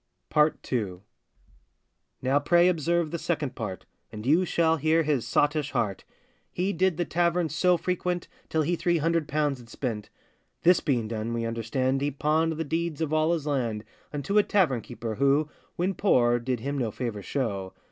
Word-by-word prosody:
PART 150 0 +4 0.2
II. 95 -7 -2 1.2
Now, 135 +2 +3
pray 175 +4 +4
observe 170 -1 0
the 170 - -3
second 150 -6 -2
part, 95 -5 -5 0.3
And 110 0 -8
you 160 +7 +4
shall 165 -1 +2
hear 160 +2 +2
his 145 -6 0
sottish 150 -1 +1
heart; 105 -7 -1 0.5
He 190 +3 -1
did 180 -1 +1
the 175 - 0
tavern 170 +1 +1
so 175 +3 +3
frequent, 180 0 -2 0.2
Till 160 -1 +1
he 175 +4 +1
three 175 0 +1
hundred 165 0 +1
pounds 145 -2 0
had 120 -1 -14
spent. 110 -4 -4 0.5
This 180 0 +6
being 125 -7 0
done, 115 +1 -3
we 115 -1 -1
understand 130 +4 -1
He 145 - +1
pawned 155 +3 +1
the 160 +1 -3
deeds 165 0 -2
of 160 -2 -1
all 155 +1 +3
his 165 -4 -1
land 120 -7 -1 0.3
Unto 150 +8 +1
a - - +7
tavern 160 - +2
keeper, 115 -2 -6
who, 140 +3 +3 0.3
When 185 +3 0
poor, 120 -12 +3
did 125 -1 -2
him 140 +2 -2
no 120 -3 0
favour 110 -2 -4
show. 100 -4 -3
145 Hz, 180 wpm, -27 LUFS, 120-170 Hz, 1.2 s, a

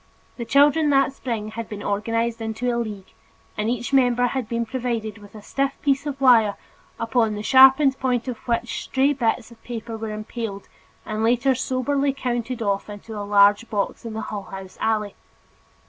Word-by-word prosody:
The 235 - -4
children 290 +5 +4
that 275 -1 +3
spring 230 -6 -4
had 230 0 -6
been 205 -1 -7
organized 230 +3 -1
into 225 +2 -2
a - - -1
league, 210 -5 -6 0.4
and 210 +1 -1
each 240 +2 -3
member 245 -2 +4
had 245 -2 -2
been 235 0 -1
provided 230 -3 -3
with 205 +1 -15
a 210 - -11
stiff 275 +4 -2
piece 280 0 +1
of 280 -1 -4
wire 230 -6 +5 0.4
upon 225 -2 +1
the 210 - -5
sharpened 265 +2 +6
point 250 -1 0
of 250 -3 -3
which 235 0 -1
stray 270 +2 +2
bits 235 -2 -1
of 235 - -17
paper 230 -1 -6
were 220 0 -5
impaled 215 -1 -6 0.4
and 215 +1 -3
later 245 +4 +3
soberly 270 +2 0
counted 245 -2 -3
off 200 0 -1
into 210 +2 -9
a 205 - -4
large 205 +2 +4
box 205 -2 -2
in 230 -2 -6
the 220 - -4
Hull 205 -3 -5
House 190 -1 -9
alley. 215 -2 0
230 Hz, 180 wpm, -23 LUFS, 215-260 Hz, 0.4 s, sharpened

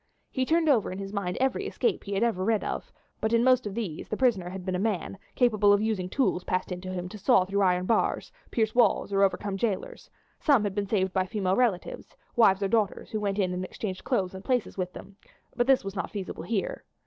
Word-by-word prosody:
He 260 -1 0
turned 325 0 +2
over 245 -11 +3
in 185 - -5
his 195 0 -6
mind 185 -3 -2
every 265 +10 0
escape 465 - -1
he 200 -1 -3
had 195 - +1
ever 220 -6 0
read 220 +1 +1
of, - - -4 0.3
but 220 +1 0
in 230 0 +4
most 255 -3 +4
of 200 - -6
these 200 -10 -4
the 215 - -2
prisoner 215 -9 +2
had 185 0 -7
been 185 - -1
a 180 - -1
man, 195 -2 -2 0.2
capable 215 -5 +4
of 205 - +5
using 210 -4 -1
tools 215 -7 0
passed 185 +1 -2
in 180 0 -4
to 185 0 -6
him 180 -1 -4
to 210 - -9
saw 185 -1 +4
through 200 +2 0
iron 180 -1 +2
bars, 225 - 0 0.2
pierce 220 -2 0
walls, 230 -4 +3
or 195 - +3
overcome 195 0 +1
jailers; 205 -2 -3 0.3
some 280 -8 +4
had 205 -2 -1
been 200 0 -2
saved 190 -3 0
by 185 -1 +1
female 190 -2 0
relatives, 215 -7 -1 0.2
wives 200 -4 +4
or - - +2
daughters, 210 -1 0
who 215 - -1
went 200 -1 -1
in 185 -3 +1
and 180 +1 -3
exchanged 185 0 -5
clothes 200 -9 0
and 190 0 -8
places 250 -1 0
with 180 -2 -3
them, 200 0 -11 0.4
but 240 0 +1
this 270 -1 +4
was 195 0 -6
not 195 - -3
feasible 200 -3 -6
here. 210 -4 -2
200 Hz, 240 wpm, -27 LUFS, 185-230 Hz, 0.4 s, of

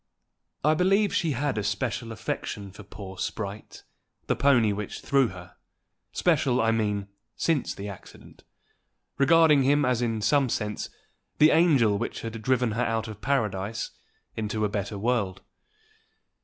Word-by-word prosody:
I 155 +2 +4
believe 195 +5 +2
she 160 -4 +1
had 135 -2 -1
a - - -2
special 115 +3 -2
affection 100 -2 -5
for 100 - -12
poor 95 -1 -10
Sprite, 100 -1 -5 0.4
the - - +1
pony 120 -7 +3
which 105 0 -5
threw 140 -2 +3
her, 90 -3 -11 0.5
special, 140 -7 +2
I 115 -1 +3
mean, 105 -3 -1 0.3
since 160 -5 0
the 100 - -6
accident, 100 -2 -12 0.8
regarding 155 0 +5
him 145 +2 +3
as 125 -1 +1
in 115 -2 0
some 140 0 +3
sense 105 -2 -3 0.5
the 155 +1 +6
angel 135 - +4
which 120 - -4
had 115 -1 -6
driven 125 -1 +1
her 115 +3 0
out 115 0 -1
of 110 -1 -9
paradise 110 -5 -1 0.4
into 110 0 -1
a - - 0
better 100 0 -3
world. 100 -4 -1
115 Hz, 145 wpm, -26 LUFS, 105-140 Hz, 0.8 s, the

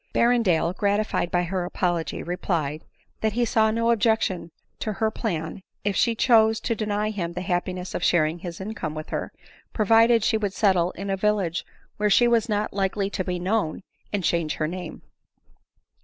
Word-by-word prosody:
Berrendale, 200 -9 +3
gratified 205 -3 0
by 175 0 +1
her 180 +1 -2
apology, 175 -2 -2
replied, 160 -4 -2 0.2
" - - -40
that 220 -1 +1
he 240 +2 +1
saw 220 -1 +3
no 230 +1 +1
objection 220 -6 +1 0.3
to 215 - -2
her 220 +2 0
plan, 170 -6 -3 0.2
if 205 -1 0
she 235 -1 +2
chose 220 -2 +4
to 230 - 0
deny 215 -1 -1
him 175 -5 -3
the 180 - -4
happiness 180 +1 -2
of - - -3
sharing 160 0 +2
his 170 -1 -7
income 190 -6 -5
with 155 0 -6
her, - - -3 0.4
provided 225 +1 +4
she 220 - +2
would 205 -3 -2
settle 185 -5 +3
in 195 +2 -5
a - - +1
village 190 -5 0 0.3
where 210 0 +1
she 240 +4 +5
was 235 -1 +2
not 210 0 -1
likely 195 0 -1
to 185 - -2
be 180 -1 -2
known, 185 -1 -1 0.3
and 205 -3 -1
change 165 -2 0
her 155 - -1
name. 180 0 -7
195 Hz, 180 wpm, -25 LUFS, 175-220 Hz, 0.4 s, she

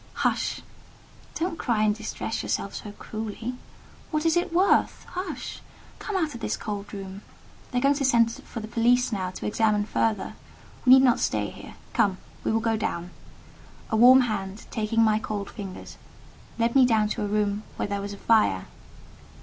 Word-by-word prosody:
"Hush! - - 0 0.7
don't 330 0 -2
cry 225 -4 +1
and 210 -1 +3
distress 220 +1 -4
yourself 195 - -2
so 210 - -7
cruelly. 220 +3 -5 0.6
What 305 0 -1
is 330 - +3
it 350 0 +1
worth? 370 +4 +2
Hush! 365 +1 -5 0.4
Come 420 - -4
out 315 -5 0
of 235 - -8
this - - -1
cold 205 -1 -5
room; 195 -1 -7 0.5
they 250 - -3
are - - +2
going 275 +2 +4
to 280 0 -2
send 235 -3 +4
for 230 0 -8
the 215 - -6
police 245 +2 +3
now 190 -4 -1
to 185 - -7
examine 210 -1 +2
further: 215 -1 0 0.5
we 255 - +10
need 265 0 +8
not 250 -3 +4
stay - - 0
here—come, 195 -3 -2 0.3
we - - 0
will 225 - +2
go 225 0 +1
down." 175 -4 -3 0.8
A - - +2
warm 250 +4 +8
hand, 205 -3 -3
taking 225 0 +1
my 215 -1 +3
cold 205 -2 -4
fingers, 195 -4 -8 0.6
led 230 0 +1
me 270 - +7
down 220 -4 +3
to - - -3
a - - -1
room 205 0 0
where - - -2
there 200 0 -2
was 200 0 -5
a - - -8
fire. 195 - +3
220 Hz, 180 wpm, -26 LUFS, 205-245 Hz, 0.8 s, we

